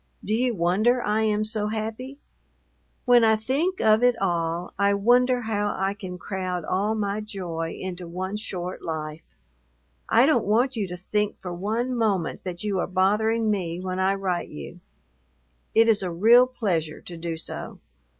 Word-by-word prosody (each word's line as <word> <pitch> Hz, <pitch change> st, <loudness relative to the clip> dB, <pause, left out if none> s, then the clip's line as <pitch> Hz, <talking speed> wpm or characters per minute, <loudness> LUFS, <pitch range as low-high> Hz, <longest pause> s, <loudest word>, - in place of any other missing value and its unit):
Do 215 Hz, -, -1 dB
you 245 Hz, +1 st, +1 dB
wonder 200 Hz, +8 st, +2 dB
I 210 Hz, +1 st, +1 dB
am 215 Hz, -1 st, +1 dB
so 215 Hz, -1 st, -1 dB
happy? 225 Hz, +5 st, -4 dB, 0.9 s
When 245 Hz, -2 st, +6 dB
I 220 Hz, -1 st, +5 dB
think 280 Hz, +12 st, -1 dB
of 215 Hz, +1 st, +4 dB
it 245 Hz, -1 st, +3 dB
all, 170 Hz, -2 st, -1 dB
I 200 Hz, 0 st, +3 dB
wonder 245 Hz, +4 st, +3 dB
how 205 Hz, -2 st, -1 dB
I 195 Hz, +1 st, 0 dB
can 185 Hz, -3 st, -7 dB
crowd 180 Hz, -2 st, -4 dB
all 205 Hz, +6 st, 0 dB
my 205 Hz, 0 st, -1 dB
joy 175 Hz, -6 st, -5 dB
into 180 Hz, -1 st, -5 dB
one 185 Hz, +3 st, -4 dB
short 185 Hz, -4 st, -5 dB
life. 155 Hz, -1 st, -5 dB, 0.9 s
I 235 Hz, +3 st, +5 dB
don't 265 Hz, -6 st, +3 dB
want 245 Hz, +5 st, +2 dB
you 210 Hz, -4 st, -1 dB
to 180 Hz, 0 st, -6 dB
think 210 Hz, +3 st, -2 dB
for 180 Hz, -2 st, -6 dB
one 225 Hz, +8 st, -2 dB
moment 205 Hz, -8 st, 0 dB
that 180 Hz, 0 st, -5 dB
you 200 Hz, -3 st, -1 dB
are -, -, -1 dB
bothering 215 Hz, +4 st, +2 dB
me 175 Hz, -4 st, -2 dB
when 185 Hz, 0 st, -3 dB
I 190 Hz, +1 st, +2 dB
write 185 Hz, -3 st, -2 dB
you. 70 Hz, -2 st, -9 dB, 1.0 s
It 225 Hz, +1 st, +6 dB
is 220 Hz, -3 st, +4 dB
a 185 Hz, -, -2 dB
real 230 Hz, +9 st, +6 dB
pleasure 175 Hz, -11 st, -2 dB
to 175 Hz, -, -9 dB
do 165 Hz, 0 st, -4 dB
so. 160 Hz, -, -6 dB
205 Hz, 170 wpm, -25 LUFS, 180-225 Hz, 1.0 s, When